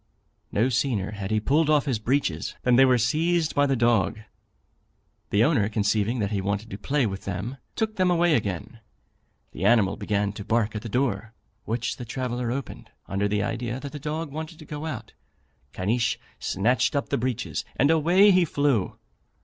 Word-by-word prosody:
No 110 +5 +2
sooner 120 -6 0
had 100 -2 -5
he 110 - +2
pulled 150 +8 +2
off 150 -2 +3
his 130 -6 0
breeches, 110 - -1
than 125 -1 +4
they 135 +2 +7
were 130 -1 +4
seized 160 +7 +1
by 145 0 +3
the 135 - +2
dog; 115 -3 +2 1.1
the 105 +2 +3
owner 120 -7 +2
conceiving 105 +2 +1
that 105 -2 -1
he 100 -2 0
wanted 100 +3 -3
to 100 - -5
play 135 +5 +1
with 95 -2 -4
them, 100 +8 -4 0.2
took 220 -1 -2
them 185 -1 +3
away 175 -1 +3
again. 105 - -2 0.7
The - - -6
animal 110 -5 +4
began 100 -1 -1
to 105 - -7
bark 110 0 0
at 105 - -3
the 115 - -7
door, 110 -2 -1 0.3
which 115 +1 -2
the 125 - -7
traveller 125 0 -3
opened, 135 +2 -6 0.2
under 100 +1 0
the 105 0 0
idea 120 +3 -3
that 140 0 -7
the 150 - -7
dog 155 +1 -4
wanted 160 +2 -6
to 155 - -12
go 150 +2 -5
out. 160 - -6 0.6
Caniche 115 +5 0 0.2
snatched 125 +7 +1
up 140 - -1
the - - +1
breeches, 125 -1 -2
and 140 +4 +3
away 175 +6 +5
he 185 -1 +5
flew. 140 - 0
120 Hz, 185 wpm, -25 LUFS, 105-145 Hz, 1.1 s, they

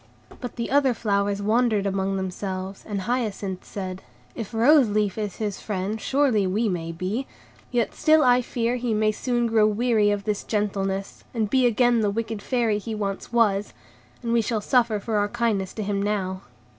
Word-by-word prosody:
But 245 -3 -6
the 235 0 -4
other 275 -3 +3
flowers 200 -2 0
wondered 220 -1 +2
among 195 0 0
themselves, 190 0 -4
and 205 -2 -2
Hyacinth 205 -4 -2
said,— 185 -2 -6 0.3
"If 225 -4 -6
Rose 245 +2 +5
Leaf 205 -2 0
is 210 -3 -3
his 210 -3 -3
friend, 205 +1 -3
surely 260 -8 +2
we 215 +5 +1
may 170 -4 -2
be; 190 +10 -3 0.4
yet 240 -2 0
still 310 0 +4
I 250 -1 +5
fear 240 0 -1
he 240 -2 -1
may 215 0 +2
soon 240 +2 -1
grow 220 -2 +4
weary 215 -1 +2
of 205 -1 -1
this 210 -1 -2
gentleness, 195 -2 -2
and 220 -3 -1
be 260 -2 +4
again 240 0 +3
the 210 -2 +2
wicked 220 0 -3
Fairy 230 -3 +1
he 220 +1 -5
once 200 0 -4
was, 210 -4 +2 0.5
and 235 0 -1
we 235 - +4
shall 225 0 -1
suffer 235 -1 +2
for 215 +1 -2
our 205 0 +1
kindness 220 -5 0
to 215 - -4
him 200 0 -1
now." 190 -2 -1
215 Hz, 180 wpm, -24 LUFS, 200-235 Hz, 0.5 s, Rose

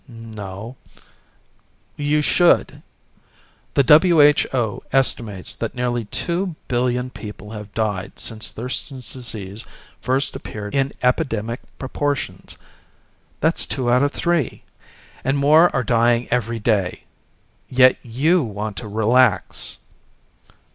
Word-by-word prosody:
"No 110 -1 -8 0.6
" - - -39 0.2
"You 150 0 +3
should. 175 +3 +3 0.9
The 140 - +4 0.6
WHO 115 -6 -2
estimates 115 -7 0
that 115 - -5
nearly 120 -2 -1
two 175 - -2
billion 125 0 0
people 105 -2 -9
have 105 -2 -8
died 105 -4 -2
since 110 -1 -3
Thurston's 125 +2 -6
Disease 110 -4 -7 0.4
first 130 +2 0
appeared 105 -1 -7
in 135 0 +1
epidemic 120 -4 0 0.2
proportions. 140 +1 -3 0.8
That's 160 +3 +1
two 125 -3 -1
out 125 +1 +4
of 145 0 +2
three. 170 -5 -1 0.6
And 135 +3 +1
more 155 +5 +6
are 130 -3 0
dying 120 0 +2
every 120 -1 0
day. 105 -4 0 0.7
Yet 130 0 +5
you 145 +10 +2
want 105 -3 -4
to 110 - -5
relax." 110 +5 +2
120 Hz, 110 wpm, -21 LUFS, 110-135 Hz, 0.9 s, more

